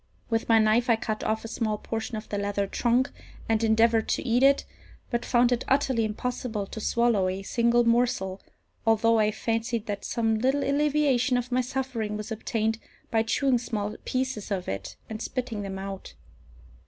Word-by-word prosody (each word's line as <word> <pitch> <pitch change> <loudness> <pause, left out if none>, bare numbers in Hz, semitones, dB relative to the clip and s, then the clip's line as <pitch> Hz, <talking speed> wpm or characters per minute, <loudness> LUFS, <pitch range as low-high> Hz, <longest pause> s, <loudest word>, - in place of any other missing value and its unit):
With 225 0 0
my 225 - +6
knife 220 +3 +3
I 230 - +6
cut 220 -1 -3
off 220 +1 -1
a - - -3
small 220 -2 -1
portion 225 +2 -4
of 215 - -7
the 205 - -3
leather 200 0 -1
trunk, 240 +6 +1 0.4
and 225 0 +1
endeavoured 225 0 +3
to - - -1
eat 240 +2 +3
it, 275 +1 +4 0.5
but 235 -1 0
found 240 0 +3
it 245 0 +1
utterly 265 -4 +2
impossible 220 -1 -3
to 220 - -8
swallow 235 -5 +2
a 190 +1 -4
single 235 +3 +2
morsel, 230 -5 +1 0.4
although 225 0 +3
I 210 -1 +3
fancied 225 +1 -2
that 205 -1 -4
some 225 -2 0
little 265 +4 +1
alleviation 280 -3 +2
of 245 +1 -3
my 255 +1 +3
suffering 250 -5 -3
was 215 +2 -7
obtained 220 0 -1 0.3
by 225 - +3
chewing 250 +3 +2
small 215 -3 -3
pieces 255 -5 -2
of 190 -3 -2
it 95 - -5
and 220 0 -6
spitting 245 -5 -3
them 195 -1 -5
out. 195 0 -7
225 Hz, 180 wpm, -27 LUFS, 215-245 Hz, 0.5 s, my